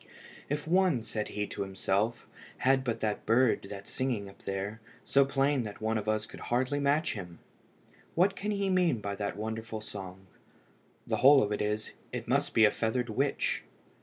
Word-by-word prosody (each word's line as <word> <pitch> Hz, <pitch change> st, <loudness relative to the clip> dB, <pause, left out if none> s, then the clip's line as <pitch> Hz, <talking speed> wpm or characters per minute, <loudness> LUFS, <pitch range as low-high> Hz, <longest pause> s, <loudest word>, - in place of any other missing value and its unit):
"If 145 Hz, +2 st, -2 dB
one," 175 Hz, -8 st, +3 dB
said 110 Hz, -2 st, -2 dB
he 105 Hz, 0 st, -2 dB
to -, -, -6 dB
himself, 100 Hz, +4 st, -1 dB, 0.3 s
"had 130 Hz, 0 st, +3 dB
but 120 Hz, -3 st, -2 dB
that 105 Hz, -1 st, -2 dB
bird 115 Hz, -2 st, +3 dB
that's 100 Hz, -1 st, -8 dB
singing 125 Hz, -6 st, -1 dB
up -, -, -22 dB
there, 100 Hz, +3 st, -3 dB, 0.2 s
so 140 Hz, -, +5 dB
plain 135 Hz, 0 st, +2 dB
that 105 Hz, -3 st, -6 dB
one 110 Hz, +1 st, 0 dB
of 105 Hz, -, -3 dB
us 110 Hz, 0 st, +1 dB
could -, -, -11 dB
hardly 130 Hz, +4 st, 0 dB
match 145 Hz, +3 st, +2 dB
him! 90 Hz, -5 st, -7 dB, 0.8 s
What 190 Hz, +3 st, +3 dB
can 210 Hz, -, -3 dB
he 200 Hz, -1 st, 0 dB
mean 180 Hz, -10 st, +3 dB
by 100 Hz, -1 st, -3 dB
that 100 Hz, -1 st, -3 dB
wonderful 110 Hz, +1 st, -4 dB
song? 95 Hz, -3 st, -8 dB, 0.8 s
The -, -, 0 dB
whole 135 Hz, +1 st, +7 dB
of 105 Hz, -, -2 dB
it 105 Hz, -, -1 dB
is, 105 Hz, +1 st, -1 dB, 0.2 s
it -, -, -5 dB
must -, -, +1 dB
be 110 Hz, -, +7 dB
a 105 Hz, -, +5 dB
feathered 115 Hz, +2 st, -1 dB
witch. 135 Hz, +6 st, 0 dB
110 Hz, 185 wpm, -30 LUFS, 105-135 Hz, 0.8 s, whole